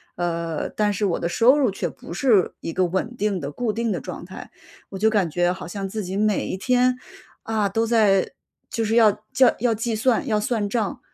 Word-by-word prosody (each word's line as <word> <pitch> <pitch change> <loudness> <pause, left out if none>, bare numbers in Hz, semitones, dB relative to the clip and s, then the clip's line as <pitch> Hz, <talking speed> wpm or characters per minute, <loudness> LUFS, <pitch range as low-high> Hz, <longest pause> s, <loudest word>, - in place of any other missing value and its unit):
呃， 170 -2 -2
但 210 -1 0
是 205 +1 -1
我 180 -4 0
的 170 - -1
收 240 +10 +4
入 255 -8 +2
却 180 -3 -3
不 170 - -11
是 205 -2 +3
一 165 - -5
个 185 +2 +1
稳 190 +7 -2
定 205 -4 0
的 140 -1 -5
固 225 +6 -2
定 230 0 -1
的 - - -1
状 - - -7
态。 - - -10 0.4
我 195 - -7
就 220 +2 +4
感 205 -5 +1
觉 175 +3 +1
好 180 -1 -6
像 195 +2 -5
自 215 0 -4
己 185 +1 -5
每 210 -1 +1
一 - - -3
天， 250 +5 +2 0.5
啊， 220 -2 0
都 225 +4 0
在 210 -5 +3 0.4
就 225 - -2
是 220 +2 0
要 225 -3 +6 0.2
叫 260 -1 +5
要 235 -1 +2
计 225 +1 -2
算、 230 +1 +1
要 215 -2 +1
算 210 -1 -1
账。 220 -2 -2
210 Hz, 235 characters per minute, -23 LUFS, 185-230 Hz, 0.5 s, 要